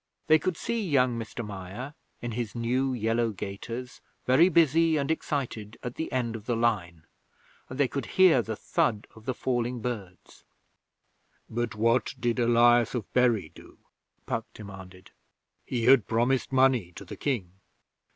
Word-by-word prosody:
They 155 0 +5
could 175 +2 -2
see 235 -1 -2
young 130 - +2
Mr 115 +1 -6
Meyer, 105 +7 -7 0.3
in 120 - -3
his 115 -1 -4
new 125 +3 0
yellow 115 -1 0
gaiters, 115 +5 -7 0.2
very 155 +8 +5
busy 165 -1 +4
and 140 +1 0
excited 120 -9 -3
at 125 - -4
the 160 - -5
end 120 -3 -1
of 110 -1 -9
the 120 - +1
line, 95 -9 -1 0.6
and 130 - -8
they 140 - +4
could 135 -2 -4
hear 180 -9 +6
the 110 -1 -4
thud 120 -6 0
of 110 0 -16
the 130 - -2
falling 120 -1 -1
birds. 105 -7 -7 1.0
'But 120 0 -3
what 115 +4 +1
did 120 0 0
Elias 120 0 +4
of 115 -6 -5
Bury 120 -5 +2
do?' - - -16 0.5
Puck - - -3
demanded. 95 -3 -11 0.6
'He 120 -2 -2
had 125 -4 +6
promised 120 +4 +1
money 130 -8 +3
to 100 - -10
the - - -8
King.' 115 -11 -2
120 Hz, 155 wpm, -27 LUFS, 110-130 Hz, 1.0 s, hear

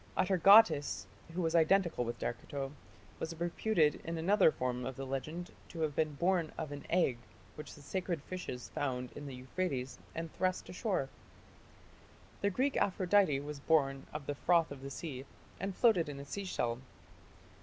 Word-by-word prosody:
Atargatis, 185 -4 +6 0.3
who 180 +1 -1
was 165 0 0
identical 170 -3 +3
with 120 0 -4
Derceto, 135 +3 -4 0.5
was 160 0 -5
reputed 170 -2 +2
in 165 0 -3
another 185 +1 +5
form 125 -2 -2
of 130 +1 -4
the 135 - -5
legend 155 +6 -4 0.2
to 165 - -6
have 155 -3 0
been 155 -2 0
born 175 0 +1
of 150 - -4
an 145 0 -7
egg 165 -9 +2 0.3
which 150 -1 -9
the 145 - -14
sacred 175 -1 -2
fishes 180 -10 -6
found 125 -3 -2
in 145 - -8
the 135 - -6
Euphrates 130 0 -3 0.2
and 165 -1 -4
thrust 185 0 -1
ashore 185 - -1
(p. - - -16 1.3
28). - - -27
The 200 - +3
Greek 260 +8 0
Aphrodite 185 -5 +3
was 145 0 -6
born 135 -3 +2
of 150 -2 -6
the 145 - -2
froth 165 +2 +2
of 140 -2 -8
the 135 - -6
sea 135 -2 -6 0.4
and 195 0 -3
floated 185 -10 +4
in 140 -1 -6
a 140 - -7
sea 200 +7 -5
shell. 120 -9 -1
160 Hz, 175 wpm, -34 LUFS, 135-180 Hz, 1.3 s, Atargatis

